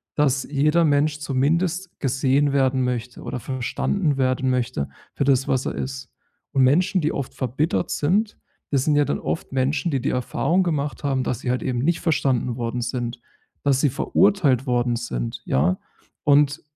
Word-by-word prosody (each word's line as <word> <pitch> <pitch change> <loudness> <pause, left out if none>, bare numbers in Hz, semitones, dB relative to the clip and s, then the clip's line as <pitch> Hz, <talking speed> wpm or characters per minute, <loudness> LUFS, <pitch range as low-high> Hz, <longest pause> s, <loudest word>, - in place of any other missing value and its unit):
dass 140 -2 +2
jeder 150 +4 +2
Mensch 145 0 +2
zumindest 165 +6 -1
gesehen 135 +1 +1
werden 130 -1 +2
möchte 125 -1 -3
oder 125 - -4
verstanden 135 - -1
werden 130 0 +1
möchte 125 - -1 0.3
für - - 0
das, 135 -1 +2
was 130 -1 0
er - - -2
ist. 135 -1 -5 0.4
Und 135 - +4
Menschen, 175 +8 +3
die 155 - 0
oft 140 -3 -4
verbittert 140 +7 -1
sind, 200 +8 0 0.3
das 135 -3 +2
sind 150 - +3
ja 145 0 +4
dann - - -1
oft - - -4
Menschen, 135 +4 0
die 135 -3 0
die 135 - 0
Erfahrung 170 +8 +1
gemacht 150 -4 -2
haben, 135 -2 0
dass 125 - -2
sie 125 - -4
halt 125 - -1
eben 125 -2 -1
nicht 165 +7 +1
verstanden 135 -7 0
worden 120 0 -2
sind, 120 0 -3 0.4
dass 140 -2 +3
sie 145 - +3
verurteilt 145 - +2
worden 120 -1 +1
sind, - - -4
ja? 80 +8 +1 0.4
Und 145 0 +3
135 Hz, 170 wpm, -23 LUFS, 125-150 Hz, 0.4 s, Und